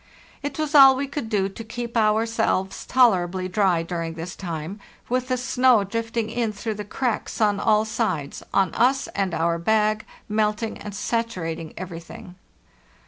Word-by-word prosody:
It 285 -1 -4
was 310 -1 -2
all 270 -2 +9
we 275 +2 -1
could 275 -4 -5
do 200 -3 +1
to 200 +4 -8
keep 235 +1 -6
ourselves 220 -3 +1
tolerably 185 -7 +3
dry 185 -3 +2
during 165 -1 -4
this 170 +2 -6
time, 170 +2 -5 0.3
with 255 +1 0
the 255 -1 0
snow 250 -2 +3
drifting 230 +2 -3
in 230 -2 -1
through 220 +2 -3
the 210 0 -6
cracks 235 +3 -3
on 205 -2 +2
all 215 0 +3
sides, 185 - -2
on 190 -4 +2
us 265 +3 +2
and 195 -2 -1
our 170 +1 +1
bag, 215 +3 +2 0.2
melting 215 +1 -1
and 205 -1 -7
sat 230 +3 0
urating 165 -6 -6
everything. 175 0 -8
215 Hz, 160 wpm, -24 LUFS, 185-235 Hz, 0.3 s, all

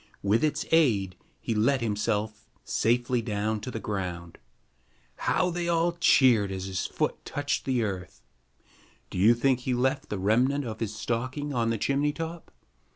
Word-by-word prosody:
With 105 +6 +2
its 155 - 0
aid, 110 - +3 0.2
he 115 - -2
let 120 +5 +2
himself 105 -1 -2 0.2
safely 120 +1 +1
down 110 0 -2
to 115 - -5
the 115 - -4
ground. 90 -5 -5 0.8
How 180 -1 +1
they 175 0 -2
all 170 0 +2
cheered 125 - +4
as 95 0 -4
his 95 -1 -2
foot - - -2
touched 145 0 -2
the 125 -3 +1
earth! 95 -4 -5 0.9
Do - - -4
you 110 +5 +6
think 130 +1 +2
he 125 0 -1
left 130 +4 0
the 105 - -2
remnant 125 +9 +2
of 110 -2 -6
his 110 -2 -3
stocking 130 +6 -3
on 115 -2 +1
the 115 - 0
chimney 140 +6 +1
top? 165 +1 -6
120 Hz, 160 wpm, -27 LUFS, 105-140 Hz, 0.9 s, you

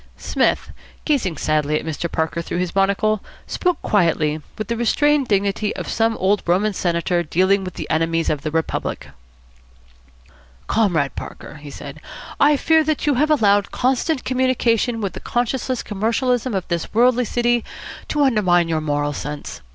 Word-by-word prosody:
Psmith, - - 0 0.3
gazing 230 - 0
sadly 150 0 +1
at - - -9
Mr. 160 +1 -3
Parker 160 +1 -1
through 170 - -4
his 180 -1 -2
monocle, 200 +2 +2 0.2
spoke 360 -3 -1
quietly, 160 -6 +1 0.2
with 215 -2 -4
the 235 - -1
restrained 280 +4 +2
dignity 200 0 0
of - - -5
some 225 0 +1
old 195 +2 +2
Roman 195 +5 +2
senator 175 -1 0
dealing 185 +4 +2
with 185 -1 -7
the - - -5
enemies 165 +1 +1
of 150 -2 0
the 155 - -3
Republic. 160 +1 -3 1.6
"Comrade 175 -11 +1
Parker," - - -8
he 145 0 -10
said, - - -9 0.4
"I 290 0 +5
fear 320 +2 +3
that 310 -1 -1
you 295 - +3
have 295 +4 +2
allowed 205 -9 +3
constant 260 +3 0
communication 250 -3 +1
with 195 -4 -2
the - - -7
conscienceless 245 +1 -1
commercialism 235 +3 0
of 190 - -2
this 170 -1 -3
worldly 245 +1 +4
city 240 +1 +1 0.4
to 295 -1 +1
undermine 185 -10 +3
your 160 -1 0
moral 145 -1 -1
sense. 145 +1 -6
205 Hz, 160 wpm, -21 LUFS, 170-245 Hz, 1.6 s, I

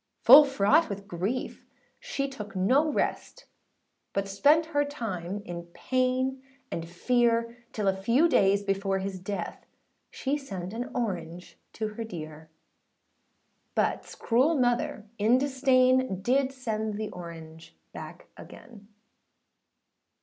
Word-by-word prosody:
â - - -44
Full 280 +5 +10
fraught 270 +4 +3
with 200 0 -6
grief, 195 +9 -3 0.4
she - - -3
took 210 -7 -9
no 265 +12 +3
rest, - - -3 0.7
But 195 0 -1
spent 290 +11 +4
her 290 0 +3
time 205 - -5
in 170 0 -7
pain 260 +1 0 0.3
and 165 0 -4
fear, 235 +4 +1 0.2
Till 210 -2 -2
a 190 - +3
few 235 - +3
days 200 -9 +3
before 195 -1 0
his 190 0 -4
death 200 +2 -5 0.5
She 280 +2 -2
sent 190 -8 -7
an 240 +2 -4
orange 180 -6 -4
to 215 -1 -3
her 215 +2 -6
dear; 155 -6 -8 1.3
Butâs - - -1
cruel 260 +8 +2
mother 245 -5 0
in 225 +4 +4
disdain, 260 -6 +2
Did 265 +3 +2
send 220 -5 -3
the 215 0 -4
orange 165 -2 -10 0.2
back - - -9
again. 205 -4 -13
220 Hz, 125 wpm, -28 LUFS, 195-260 Hz, 1.3 s, Full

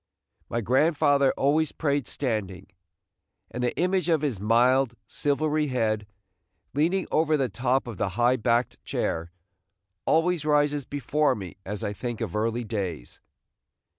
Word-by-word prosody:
My 115 - -1
grandfather 140 - +3
always 150 +2 +2
prayed 145 -4 -1
standing, 100 -8 -3 0.9
and 125 - -4
the 120 - -1
image 180 -1 +1
of 160 -3 +2
his 130 -10 -1
mild, 120 +4 +3
silvery 150 +1 0
head, 110 -5 -1 0.7
leaning 170 +6 +1
over 155 -1 +3
the 135 -3 0
top 130 +3 0
of 120 -5 -7
the 100 - 0
high 120 +2 +4
backed 120 +2 0
chair, 85 +1 -2 0.8
always 165 0 +2
rises 145 -2 +2
before 145 +2 0
me 95 -4 -8
as 105 0 -4
I 105 - -2
think 120 +1 -5
of 110 -6 -4
early 115 +3 0
days. 95 - -5
130 Hz, 135 wpm, -26 LUFS, 110-150 Hz, 0.9 s, high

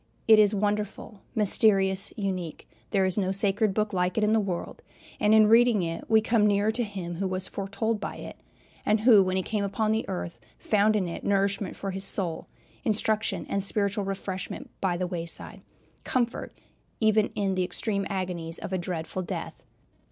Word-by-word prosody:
It 220 -1 +8
is 210 0 +5
wonderful, 210 0 -2
mysterious, 195 -2 +3
unique 185 -5 -4 0.2
there 195 -2 +2
is 185 +2 0
no 190 -1 0
sacred 200 +2 +2
book 210 +1 -1
like 180 +1 0
it 220 - +2
in 210 +1 +3
the 225 - +4
world; 190 -4 -4 0.4
and 210 -1 +3
in 220 0 +7
reading 230 -2 +5
it 165 0 -5
we 220 -1 +5
come 220 -1 +3
nearer 205 +1 +2
to 240 +2 -1
Him 185 -5 -5
who 195 +1 -1
was 185 0 -1
foretold 205 +3 -2
by - - -5
it, - - -9 0.5
and 210 0 +2
who 220 -3 +7
when 185 0 0
he 190 - 0
came 210 +1 -2
upon 215 +2 0
the 220 -1 -1
earth 180 -2 -5 0.2
found 215 0 +2
in 195 -4 0
it 170 - -6
nourishment 200 -1 0
for 195 - -4
his 190 +1 -5
soul, 180 -5 0 0.4
instruction 220 -2 0
and 200 - -1
spiritual 200 +1 0
refreshment 195 -1 -5
by 180 -3 0
the 180 - -1
wayside, 170 -2 -6 0.4
comfort 240 -2 -1 0.5
even 215 -1 +3
in 195 -2 0
the 185 0 0
extreme 200 +2 -2
agonies 180 -4 -3
of 190 - -6
a 185 - 0
dreadful 175 0 -4
death. 180 - -6
200 Hz, 180 wpm, -27 LUFS, 185-215 Hz, 0.5 s, It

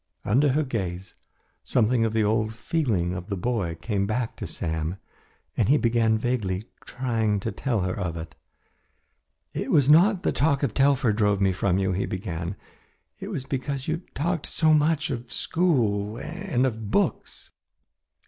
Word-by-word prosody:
Under 135 +6 +3
her 155 +2 +2
gaze, 95 -8 -4 0.5
something 115 0 +2
of 110 - -1
the 110 -1 +2
old 110 +1 0
feeling 115 - 0
of 90 0 -6
the 100 - -2
boy 95 -5 -1
came 100 +3 -2
back 115 +2 -2
to - - -5
Sam, 80 +2 -3 0.6
and - - +1
he 145 - +6
began 115 -3 +2
vaguely 110 -5 -1 0.2
trying 115 -5 0
to 110 - -2
tell 120 -7 -1
her 90 0 -1
of 85 -4 -3
it. 80 -1 -7 1.2
"It - - -3
was 145 -1 +5
not 185 +4 +5
the - - +2
talk 140 0 +1
of 125 -7 0
Telfer 135 -5 +3
drove 105 -2 +2
me 95 -1 +2
from 95 0 +1
you," 95 -1 +1
he 95 +2 -1
began, 90 -1 -4 0.6
"it - - -6
was 130 - -4
because 135 0 -3
you 160 +1 0 0.2
talked 165 +2 -1
so 155 -1 +3
much 155 +1 +2
of 120 -2 -4
the - - -11
schools 115 - +1
and 165 -7 -1
of 110 -4 -3
books. - - -1
115 Hz, 165 wpm, -25 LUFS, 100-140 Hz, 1.2 s, he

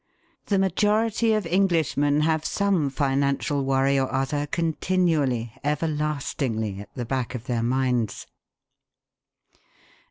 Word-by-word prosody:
The 200 - +2
majority 210 +4 +2
of 215 -3 0
Englishmen 165 -5 +2
have 160 0 +1
some 190 -8 +1
financial 140 +1 0
worry 135 +1 +2
or 130 - -1
other 140 +2 -1
continually, 160 -8 0
everlastingly 145 -8 -2
at 100 0 -12
the 120 - -4
back 130 +1 -2
of 120 - -6
their 120 -2 -1
minds. 125 -3 0
145 Hz, 105 wpm, -25 LUFS, 130-165 Hz, -, The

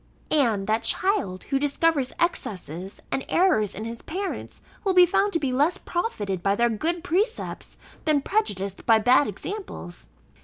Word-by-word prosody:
And 230 -10 +2
that 220 +2 +1
child, 285 - 0
who 275 -1 0
discovers 290 -1 +1
excesses 190 - -2
and 270 - 0
errors 275 - +2
in 215 - -5
his 230 0 -6
parents, 385 +4 -5 0.2
will 385 -3 +1
be 360 -1 +9
found 395 +4 +2
to 330 - +2
be 270 -4 -1
less 300 +8 +2
profited 210 - -3
by 195 +2 +2
their 235 +2 +2
good 330 +10 -2
precepts, 395 +7 -2 0.3
than 305 -3 +3
prejudiced 200 - -2
by 225 -2 +7
bad 245 +6 +4
examples. 210 - -7
275 Hz, 155 wpm, -25 LUFS, -, 0.3 s, be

